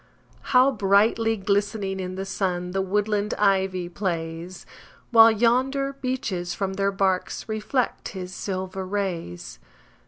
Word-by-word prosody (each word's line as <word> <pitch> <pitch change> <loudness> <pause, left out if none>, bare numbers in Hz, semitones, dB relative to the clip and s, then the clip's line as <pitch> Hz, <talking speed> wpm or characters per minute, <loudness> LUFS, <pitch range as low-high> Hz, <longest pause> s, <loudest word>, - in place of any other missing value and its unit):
How 255 +1 +5
brightly 220 +1 +2
glistening 200 0 -1
in 185 0 -4
the 190 +1 -4
sun 180 -2 -2
The 195 +1 0
woodland 210 +2 0
ivy 190 -3 +1
plays! 170 -1 -4 0.5
While 225 -1 +9
yonder 260 +5 +1
beeches 235 -10 -3
from 195 -1 -2
their 195 +1 0
barks 190 -2 -1
Reflect 220 +4 -2
his 185 -2 -7
silver 190 0 -4
rays. 185 - -4
195 Hz, 120 wpm, -24 LUFS, 185-220 Hz, 0.5 s, While